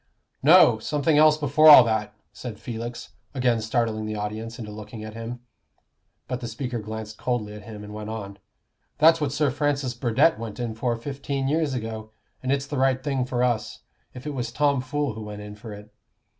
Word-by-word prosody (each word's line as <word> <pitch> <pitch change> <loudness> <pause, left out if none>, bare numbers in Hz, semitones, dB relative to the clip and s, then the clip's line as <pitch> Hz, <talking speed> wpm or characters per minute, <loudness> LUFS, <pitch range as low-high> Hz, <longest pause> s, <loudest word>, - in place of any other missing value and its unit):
"No! 140 -7 +7
something 150 +5 +1
else 155 0 +6
before 155 +1 +5
all 145 -4 +11
that," 110 -2 -1 0.2
said 115 -4 -8
Felix, 120 0 -6 0.3
again 125 -3 +1
startling 110 -1 -1
the 110 - -3
audience 110 +2 -5
into 110 -4 -7
looking 110 +1 -9
at 110 0 -8
him. 115 +2 -7 0.9
But 125 - -3
the 120 - -5
speaker 120 +1 -4
glanced 110 0 -7
coldly 120 -4 -2
at 105 - -9
him 105 -2 -9
and 105 0 -9
went 105 0 -6
on. 100 -3 -6 0.6
"That's 160 +1 +5
what 145 -2 0
Sir 145 -1 +1
Francis 145 -2 -1
Burdett 120 +4 +2
went 115 0 -7
in 120 -2 -3
for 120 +1 -1
fifteen 135 +2 -4
years 150 -2 0
ago; 110 -2 -5 0.3
and 130 - -1
it's 140 0 0
the 140 -1 -4
right 130 0 +2
thing 135 -4 0
for 125 -1 -1
us, 110 -3 -1 0.3
if 125 +2 -9
it 150 - -3
was 120 -3 -3
Tomfool 140 0 0
who 110 - -8
went 105 -1 -7
in 105 0 -8
for 105 +1 -10
it. 105 +1 -11
120 Hz, 195 wpm, -25 LUFS, 110-140 Hz, 0.9 s, all